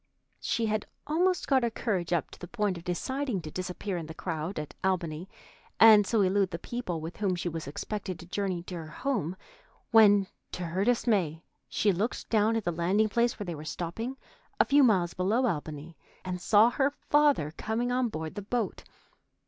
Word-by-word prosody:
She 230 Hz, -, -1 dB
had 215 Hz, -1 st, -1 dB, 0.2 s
almost 355 Hz, +5 st, +1 dB
got 265 Hz, -2 st, +4 dB
her 235 Hz, -, +1 dB
courage 190 Hz, -7 st, -2 dB
up 170 Hz, -3 st, 0 dB
to -, -, -13 dB
the 175 Hz, -, -8 dB
point 210 Hz, -2 st, -1 dB
of 170 Hz, -, -9 dB
deciding 250 Hz, +6 st, -2 dB
to 155 Hz, -, -7 dB
disappear 185 Hz, +2 st, -4 dB
in 165 Hz, -2 st, -5 dB
the 160 Hz, -, -8 dB
crowd 165 Hz, +2 st, -4 dB
at 150 Hz, -1 st, -5 dB
Albany, 180 Hz, -2 st, -1 dB, 0.5 s
and 215 Hz, -3 st, +8 dB
so 225 Hz, -3 st, +2 dB
elude 195 Hz, 0 st, +2 dB
the 170 Hz, -, -4 dB
people 180 Hz, -3 st, -4 dB
with 160 Hz, +2 st, -7 dB
whom 195 Hz, -3 st, 0 dB
she 175 Hz, -, -3 dB
was 165 Hz, -3 st, -4 dB
expected 185 Hz, +4 st, -4 dB
to 175 Hz, -, -11 dB
journey 185 Hz, -1 st, -2 dB
to 180 Hz, -, -9 dB
her 165 Hz, -3 st, -6 dB
home, 185 Hz, -, -2 dB, 0.6 s
when, 205 Hz, -3 st, +7 dB, 0.3 s
to 180 Hz, -, -4 dB
her 175 Hz, +3 st, -1 dB
dismay, 200 Hz, -9 st, +1 dB, 0.3 s
she 210 Hz, -, +2 dB
looked 205 Hz, +6 st, -3 dB
down 220 Hz, 0 st, +3 dB
at 225 Hz, -, -1 dB
the 175 Hz, -, 0 dB
landing 185 Hz, +6 st, +1 dB
place 235 Hz, +2 st, +1 dB
where 205 Hz, -, -5 dB
they 175 Hz, -, -4 dB
were 150 Hz, -1 st, -8 dB
stopping, 180 Hz, -, -4 dB, 0.4 s
a -, -, +6 dB
few 285 Hz, +1 st, +5 dB
miles 190 Hz, -9 st, +3 dB
below 210 Hz, +8 st, +1 dB
Albany, 155 Hz, -4 st, -4 dB, 0.3 s
and 180 Hz, -1 st, -4 dB
saw 215 Hz, +5 st, +5 dB
her 275 Hz, +1 st, +2 dB
father 290 Hz, -, +2 dB
coming 235 Hz, +3 st, -2 dB
on 250 Hz, -1 st, +1 dB
board 160 Hz, -4 st, -5 dB
the 205 Hz, -, -5 dB
boat. 220 Hz, +1 st, -2 dB
195 Hz, 195 wpm, -29 LUFS, 170-230 Hz, 0.6 s, and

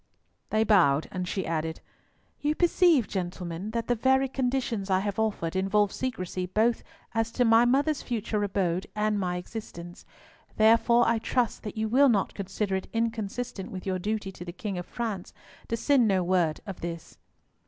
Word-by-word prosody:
They 215 Hz, 0 st, +2 dB
bowed, 170 Hz, -10 st, +4 dB
and 180 Hz, -1 st, -3 dB
she 190 Hz, 0 st, -2 dB
added, 160 Hz, 0 st, -2 dB, 0.6 s
"You 295 Hz, +1 st, 0 dB
perceive, 340 Hz, -, +4 dB
gentlemen, 180 Hz, 0 st, -4 dB
that 230 Hz, +1 st, -2 dB
the 245 Hz, -, +3 dB
very 265 Hz, +3 st, +3 dB
conditions 250 Hz, -6 st, -1 dB
I 185 Hz, -1 st, +3 dB
have 205 Hz, +1 st, -3 dB
offered 200 Hz, -6 st, -1 dB
involve 195 Hz, +2 st, +2 dB
secrecy 185 Hz, -7 st, -3 dB
both 220 Hz, +5 st, +1 dB, 0.3 s
as 225 Hz, 0 st, 0 dB
to 245 Hz, -, +2 dB
my 225 Hz, +1 st, +6 dB
mother's 285 Hz, +4 st, +2 dB
future 220 Hz, -3 st, -2 dB
abode 190 Hz, -2 st, -1 dB
and 210 Hz, 0 st, +1 dB
my 180 Hz, -2 st, -1 dB
existence. 180 Hz, -2 st, -8 dB, 0.5 s
Therefore, 230 Hz, +2 st, +5 dB
I 230 Hz, 0 st, +2 dB
trust 240 Hz, +1 st, 0 dB
that 215 Hz, 0 st, -7 dB
you 220 Hz, 0 st, 0 dB
will 265 Hz, +5 st, +5 dB
not 205 Hz, -5 st, +1 dB
consider 195 Hz, 0 st, -2 dB
it 190 Hz, -, -4 dB
inconsistent 225 Hz, -2 st, -3 dB
with 185 Hz, -1 st, -7 dB
your 185 Hz, -1 st, -1 dB
duty 210 Hz, 0 st, -2 dB
to 180 Hz, -, -9 dB
the 175 Hz, -, -6 dB
King 195 Hz, 0 st, -4 dB
of 175 Hz, -, -7 dB
France 220 Hz, -6 st, -4 dB, 0.3 s
to 230 Hz, -, -1 dB
send 260 Hz, -1 st, +3 dB
no 190 Hz, -3 st, +2 dB
word 175 Hz, -3 st, +1 dB
of 195 Hz, -3 st, -7 dB
this." 170 Hz, -1 st, -7 dB
210 Hz, 175 wpm, -27 LUFS, 185-230 Hz, 0.6 s, my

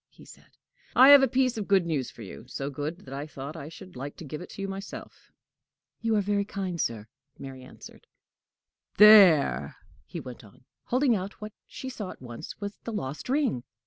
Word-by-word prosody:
he -, -, -18 dB
said; -, -, -18 dB, 0.4 s
"I 260 Hz, +2 st, +8 dB
have 285 Hz, -1 st, +10 dB
a 270 Hz, -, +4 dB
piece 255 Hz, -2 st, +1 dB
of 205 Hz, -, -5 dB
good 195 Hz, -3 st, +3 dB
news 150 Hz, -6 st, -2 dB
for 115 Hz, -, -12 dB
you 110 Hz, +4 st, -11 dB
so 135 Hz, +2 st, -5 dB
good 150 Hz, +6 st, -5 dB
that 135 Hz, -, -11 dB
I 140 Hz, +2 st, -5 dB
thought 140 Hz, +1 st, -8 dB
I 150 Hz, -2 st, -8 dB
should 185 Hz, +2 st, -13 dB
like 140 Hz, +3 st, -7 dB
to -, -, -10 dB
give 150 Hz, +3 st, -7 dB
it 180 Hz, -, -11 dB
you 195 Hz, 0 st, -3 dB
myself." 195 Hz, +1 st, -9 dB, 0.7 s
"You 225 Hz, -1 st, +1 dB
are 210 Hz, -, +3 dB
very 200 Hz, 0 st, 0 dB
kind, 190 Hz, -4 st, -4 dB
sir," 110 Hz, -2 st, -3 dB, 0.3 s
Mary 135 Hz, -1 st, -9 dB
answered. 130 Hz, -, -14 dB, 0.9 s
"There!" 165 Hz, -, +7 dB, 0.3 s
he -, -, -6 dB
went 125 Hz, -2 st, -10 dB
on, 105 Hz, +4 st, -19 dB, 0.2 s
holding 255 Hz, -1 st, +2 dB
out 195 Hz, +1 st, -5 dB
what 210 Hz, -1 st, -8 dB
she 265 Hz, -, -8 dB
saw 220 Hz, -7 st, -6 dB
at -, -, -10 dB
once 125 Hz, +4 st, -9 dB
was 205 Hz, 0 st, -6 dB
the 230 Hz, -, -5 dB
lost 145 Hz, -, -5 dB
ring. 260 Hz, -, 0 dB
180 Hz, 200 wpm, -27 LUFS, 135-210 Hz, 0.9 s, have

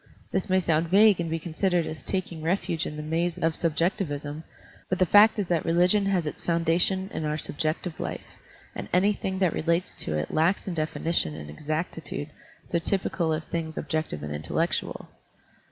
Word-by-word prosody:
This 190 Hz, +1 st, -1 dB
may 185 Hz, 0 st, +4 dB
sound 165 Hz, -2 st, +1 dB
vague 205 Hz, +1 st, +6 dB
and 170 Hz, -1 st, -1 dB
be 165 Hz, -, 0 dB
considered 175 Hz, +1 st, 0 dB
as 155 Hz, -, -5 dB
taking 185 Hz, -4 st, -3 dB
refuge 170 Hz, -1 st, 0 dB
in 150 Hz, -, -6 dB
the 150 Hz, -, -5 dB
maze 165 Hz, +2 st, -1 dB
of 165 Hz, 0 st, +1 dB
subjectivism; 160 Hz, -3 st, -1 dB, 0.5 s
but 185 Hz, -, +1 dB
the 185 Hz, -, +4 dB
fact 210 Hz, +5 st, +7 dB
is 205 Hz, -3 st, -1 dB
that 170 Hz, -3 st, +1 dB
religion 180 Hz, +4 st, +3 dB
has 185 Hz, -4 st, +1 dB
its 150 Hz, -, -5 dB
foundation 170 Hz, +3 st, +2 dB
in -, -, -3 dB
our 150 Hz, 0 st, -1 dB
subjective 155 Hz, +3 st, -3 dB
life, -, -, -6 dB, 0.3 s
and -, -, -6 dB
anything 190 Hz, 0 st, +2 dB
that 185 Hz, -3 st, +2 dB
relates 170 Hz, +2 st, 0 dB
to 75 Hz, -, -2 dB
it 75 Hz, -, -3 dB
lacks 170 Hz, +7 st, +2 dB
in 185 Hz, -, -2 dB
definition 155 Hz, -, +1 dB
and 75 Hz, -1 st, -8 dB
exactitude 155 Hz, -, -4 dB, 0.4 s
so 170 Hz, -, 0 dB
typical 170 Hz, -2 st, 0 dB
of 155 Hz, 0 st, -1 dB
things 160 Hz, -1 st, -4 dB
objective 155 Hz, -, -2 dB
and 75 Hz, 0 st, -4 dB
intellectual. 75 Hz, +1 st, -2 dB
165 Hz, 175 wpm, -27 LUFS, 155-185 Hz, 0.5 s, fact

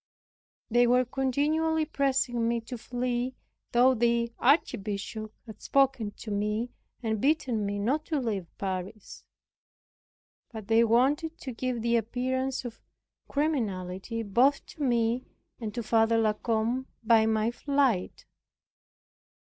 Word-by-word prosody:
They 240 Hz, +1 st, +5 dB
were 250 Hz, +1 st, +4 dB
continually 300 Hz, +5 st, +1 dB
pressing 260 Hz, -5 st, 0 dB
me 235 Hz, 0 st, +1 dB
to 235 Hz, +3 st, -7 dB
flee, 245 Hz, +1 st, -2 dB, 0.4 s
though 250 Hz, +2 st, +5 dB
the 235 Hz, 0 st, +1 dB
Archbishop 215 Hz, -, 0 dB
had 220 Hz, -3 st, -11 dB
spoken 265 Hz, -6 st, +2 dB
to 215 Hz, -, -7 dB
myself, 210 Hz, +4 st, -1 dB, 0.3 s
and 220 Hz, -2 st, -1 dB
bidden 260 Hz, -8 st, +1 dB
me 205 Hz, 0 st, -2 dB
not 265 Hz, +10 st, 0 dB
to 310 Hz, -3 st, -1 dB
leave 210 Hz, -8 st, -2 dB
Paris. 190 Hz, +1 st, -5 dB, 1.3 s
But 220 Hz, -3 st, -8 dB
they 225 Hz, +1 st, +5 dB
wanted 275 Hz, +8 st, +2 dB
to 265 Hz, -, -5 dB
give 245 Hz, -1 st, -3 dB
the 235 Hz, 0 st, +3 dB
appearance 255 Hz, +3 st, -2 dB
of 230 Hz, -2 st, -8 dB, 0.5 s
criminality 225 Hz, -, -2 dB
both 245 Hz, +7 st, +2 dB
to 310 Hz, -, -12 dB
me 240 Hz, -2 st, +1 dB, 0.3 s
and 220 Hz, -3 st, -4 dB
to 240 Hz, -, -2 dB
Father 225 Hz, +1 st, +3 dB
La 220 Hz, -1 st, +3 dB
Combe 230 Hz, +4 st, -1 dB, 0.2 s
by 225 Hz, -1 st, +5 dB
my 220 Hz, +1 st, +1 dB
flight. 270 Hz, -7 st, 0 dB
235 Hz, 125 wpm, -28 LUFS, 220-260 Hz, 1.3 s, They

